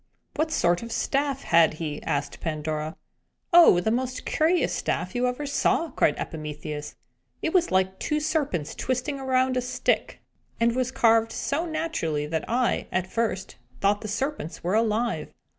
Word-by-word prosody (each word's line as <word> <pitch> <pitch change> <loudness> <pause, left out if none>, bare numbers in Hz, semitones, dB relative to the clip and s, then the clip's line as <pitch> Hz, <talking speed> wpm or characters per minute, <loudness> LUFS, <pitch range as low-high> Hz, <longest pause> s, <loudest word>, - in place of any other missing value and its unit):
"What 315 +1 0
sort 175 - +2
of 230 - -7
a - - -4
staff 275 -1 0
had 165 -2 +4
he?" 155 -2 -4
asked 140 0 -2
Pandora. 155 0 -3 0.6
"Oh, 340 - +8
the 220 +5 0
most 255 +1 -2
curious 330 +3 +2
staff - - -2
you 250 0 +1
ever 250 +4 -3
saw!" 315 +3 +1
cried - - +2
Epimetheus. 150 -1 -6 0.5
"It 320 - 0
was 355 -2 +3
like 190 0 +1
two 300 - 0
serpents 285 - -1
twisting 260 +3 -2
around 260 -1 +1
a - - +2
stick, 250 - -1 0.4
and 235 0 +2
was 255 -1 0
carved 225 -2 +3
so 315 +8 -2
naturally 310 - -2
that 160 +1 -2
I, 245 +1 +1
at 185 -1 0
first, 205 -1 -2 0.2
thought 205 +6 +2
the 215 - -5
serpents 265 - -3
were 180 +3 0
alive." 225 +2 0
230 Hz, 160 wpm, -26 LUFS, 170-275 Hz, 0.6 s, Oh